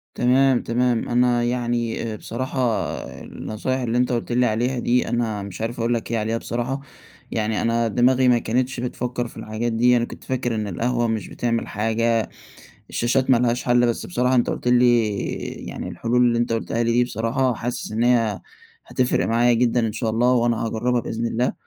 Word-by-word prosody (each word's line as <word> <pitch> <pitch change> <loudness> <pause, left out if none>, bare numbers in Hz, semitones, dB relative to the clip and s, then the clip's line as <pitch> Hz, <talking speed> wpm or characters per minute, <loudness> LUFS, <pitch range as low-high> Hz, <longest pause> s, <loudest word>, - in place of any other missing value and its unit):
تمام، 130 +1 +3
تمام، 120 0 0
أنا 120 0 +2
يعني 120 -1 -1
آآ - - -4
بصراحة 130 +5 -5 0.6
النصايح 130 +5 -4
اللي 120 -1 -1
أنت 125 0 +2
قُلت 120 0 -2
لي 125 +1 +3
عليها 120 +3 0
دي 125 +1 +1
أنا 115 -3 -1
مش 100 +1 -8
عارف 115 +2 -3
أقول 115 +1 +1
لك 115 0 -3
إيه 115 - +1
عليها 110 +1 -1
بصراحة، 120 +4 -3 0.5
يعني 110 -1 -1
أنا 115 0 +1
دماغي 125 +3 +3
ما 120 -1 +5
كانتش 125 +3 -1
بتفكَّر 125 0 -3
في - - -14
الحاجات 110 +2 -3
دي، 120 +2 +4
أنا 120 - +1
كنت - - -11
فاكر 125 -2 -2
إن 105 -1 -2
القهوة 120 +5 0
مش 110 -1 -2
بتعمل 115 -1 -2
حاجة، 115 +2 0 0.6
الشاشات 125 +3 0
ما 130 - +6
لهاش 120 0 0
حل، 120 0 +3
بس 115 - -2
بصراحة 125 -6 +1
أنت 120 - +2
قُلت - - -3
لي، 120 -2 +4 0.6
يعني - - -6
الحلول 120 +2 0
اللي 120 -1 +2
أنت 120 -1 0
قُلتها 115 +1 -1
لي 115 - +1
دي 120 +1 +3
بصراحة 120 +2 0
حاسس 120 +1 -4
إن 110 +2 0
هي 115 -4 +2 0.4
هتفرِق 125 -1 0
معايا 120 +2 +3
جدًا 120 +1 +2
إن - - -3
شاء 110 +1 -2
الله 120 +3 +2
وأنا 120 -2 +1
هاجرّبها 120 +2 0
بإذن 115 +1 -3
الله، 120 +2 0
120 Hz, 190 wpm, -22 LUFS, 115-125 Hz, 0.6 s, ما